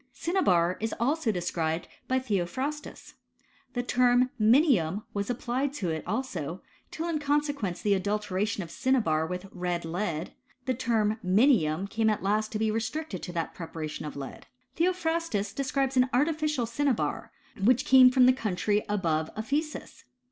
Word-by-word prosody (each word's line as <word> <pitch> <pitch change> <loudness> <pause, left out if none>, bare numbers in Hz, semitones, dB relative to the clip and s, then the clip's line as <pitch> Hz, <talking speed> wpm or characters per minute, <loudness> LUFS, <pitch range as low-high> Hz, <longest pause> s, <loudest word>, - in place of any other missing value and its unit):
Cinnabar 185 - +2
is 225 0 -2
also 265 0 +1
described 170 -3 -2 0.2
*by 260 - +2
Theophrastus. 260 - -3 0.6
The 245 - 0
I - - -9
term 250 0 +3
mtntum 215 - +4
was 200 +1 -2
applied 255 +3 -1
to 190 - -2
it 160 -1 -3
also, 185 - -3 0.3
till 330 +1 -4
in 325 -3 -1
consequence 290 - 0
of - - -13
the 205 - +3
adulteration 205 0 -1
of 165 - -10
cinnabar 215 - +1
with 180 +2 -5
red 175 -2 -3
lead, 170 -1 -3 0.3
the 260 - +1
term 225 -3 0
minium 190 - +3
came 220 +2 +1
at 215 - -1
last 215 +2 0
to - - 0
be 220 0 +1
restricted 225 - -3
to - - -6
that 165 -2 -3
pre 170 - -6
I - - -20
paration 155 -1 -5
of - - -7
lead. 140 -1 -8 0.3
Theophrastus 330 - 0
describes 270 0 -1
an 255 0 +4
artificial 300 0 +1
I 230 - -5
cinnabar, 275 -1 -1 0.3
which 245 +3 +4
came 260 -1 +8
from 255 0 +5
the 255 - +6
country 210 -3 0
above 165 -6 0
Ephesus. 285 +8 -3
220 Hz, 160 wpm, -28 LUFS, 180-265 Hz, 0.6 s, came